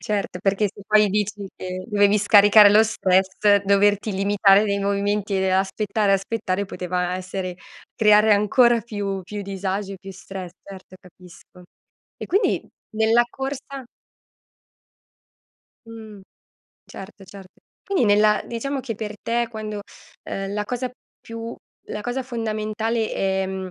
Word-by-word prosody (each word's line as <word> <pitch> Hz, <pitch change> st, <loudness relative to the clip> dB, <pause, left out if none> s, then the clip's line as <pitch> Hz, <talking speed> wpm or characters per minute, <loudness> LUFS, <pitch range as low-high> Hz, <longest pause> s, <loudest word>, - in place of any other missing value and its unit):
Certo, 200 Hz, -3 st, -3 dB
perché 200 Hz, +1 st, +1 dB
se 205 Hz, -, -13 dB
poi 210 Hz, -1 st, +4 dB
dici 205 Hz, 0 st, -2 dB
che, 185 Hz, 0 st, -6 dB
dovevi 205 Hz, -1 st, +3 dB
scaricare 205 Hz, 0 st, +7 dB
lo 215 Hz, +2 st, +6 dB
stress, 190 Hz, -3 st, +1 dB, 0.3 s
doverti 205 Hz, +1 st, +2 dB
limitare 200 Hz, +1 st, +4 dB
nei 200 Hz, -1 st, -1 dB
movimenti 200 Hz, 0 st, -1 dB
e 190 Hz, 0 st, +1 dB
aspettare, 200 Hz, +2 st, 0 dB
aspettare, 195 Hz, -1 st, -1 dB
poteva 180 Hz, -1 st, -3 dB
essere 185 Hz, -1 st, -5 dB, 0.4 s
creare 210 Hz, -1 st, +5 dB
ancora 235 Hz, +4 st, +4 dB
più 200 Hz, -3 st, -4 dB
più 205 Hz, +3 st, -7 dB
disagi 195 Hz, 0 st, -4 dB
e 190 Hz, -, -9 dB
più 195 Hz, +1 st, -10 dB
stress 190 Hz, -1 st, -9 dB
certo, 190 Hz, -1 st, -13 dB
capisco. 180 Hz, 0 st, -17 dB, 0.6 s
E -, -, -6 dB
quindi, 395 Hz, +5 st, 0 dB, 0.3 s
nella 225 Hz, +2 st, +4 dB
corsa 270 Hz, 0 st, -6 dB, 2.0 s
Mh. 220 Hz, -3 st, -11 dB, 0.7 s
Certo, 195 Hz, 0 st, -11 dB
cert 190 Hz, 0 st, -13 dB, 0.3 s
Quindi 390 Hz, -9 st, 0 dB
nella 210 Hz, 0 st, +3 dB
diciamo 270 Hz, +4 st, -4 dB
che 250 Hz, -3 st, -5 dB
per 215 Hz, 0 st, -6 dB
te 235 Hz, +1 st, 0 dB
quando 215 Hz, -2 st, -6 dB, 0.5 s
uhm, 195 Hz, 0 st, -4 dB
la 210 Hz, 0 st, -2 dB
cosa 250 Hz, +3 st, -4 dB, 0.3 s
più 230 Hz, 0 st, -7 dB, 0.3 s
la 210 Hz, -, -5 dB
cosa 245 Hz, +4 st, -3 dB
fondamentale 225 Hz, -1 st, -2 dB
è, 190 Hz, 0 st, -1 dB
mhmm, 190 Hz, -1 st, -5 dB
205 Hz, 130 wpm, -22 LUFS, 195-220 Hz, 2.0 s, scaricare